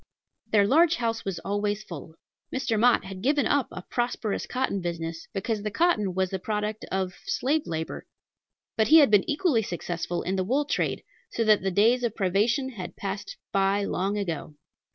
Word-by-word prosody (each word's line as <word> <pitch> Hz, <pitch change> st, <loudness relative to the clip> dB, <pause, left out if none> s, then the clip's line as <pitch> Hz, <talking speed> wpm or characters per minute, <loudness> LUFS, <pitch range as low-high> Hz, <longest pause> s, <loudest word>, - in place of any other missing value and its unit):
Their 205 Hz, -2 st, +4 dB
large 320 Hz, +9 st, +4 dB
house 230 Hz, -1 st, -2 dB
was 195 Hz, -3 st, -3 dB
always 205 Hz, +1 st, -1 dB
full. 160 Hz, -1 st, -9 dB, 0.4 s
Mr. 235 Hz, -4 st, 0 dB
Mott 240 Hz, -2 st, +4 dB
had 190 Hz, -1 st, -7 dB
given 285 Hz, +5 st, +2 dB
up 285 Hz, -3 st, +2 dB
a 180 Hz, -, -7 dB
prosperous 240 Hz, -3 st, -2 dB
cotton 255 Hz, -6 st, -1 dB
business, 165 Hz, -1 st, -4 dB
because 210 Hz, +2 st, -2 dB
the 215 Hz, -, -2 dB
cotton 210 Hz, -, +1 dB
was 185 Hz, -1 st, 0 dB
the 190 Hz, -, -2 dB
product 210 Hz, +2 st, -3 dB
of 190 Hz, -1 st, -1 dB
slave 295 Hz, +4 st, 0 dB
labor; 160 Hz, -1 st, -4 dB, 0.7 s
but 220 Hz, -, +2 dB
he 320 Hz, -, +8 dB
had 285 Hz, -8 st, +6 dB
been 205 Hz, -2 st, +4 dB
equally 295 Hz, -6 st, +2 dB
successful 175 Hz, -2 st, -3 dB
in 190 Hz, +2 st, -1 dB
the 185 Hz, -, +1 dB
wool 265 Hz, +9 st, +1 dB
trade, -, -, -1 dB, 0.3 s
so 230 Hz, -, -1 dB
that 215 Hz, -2 st, +4 dB
the 195 Hz, -, 0 dB
days 225 Hz, +7 st, +3 dB
of 230 Hz, -3 st, -1 dB
privation 215 Hz, +8 st, +1 dB
had 185 Hz, -8 st, -7 dB
passed 195 Hz, 0 st, -5 dB
by 195 Hz, +1 st, +2 dB
long 200 Hz, +1 st, -1 dB
ago. 165 Hz, -6 st, -4 dB
205 Hz, 180 wpm, -26 LUFS, 190-240 Hz, 0.7 s, he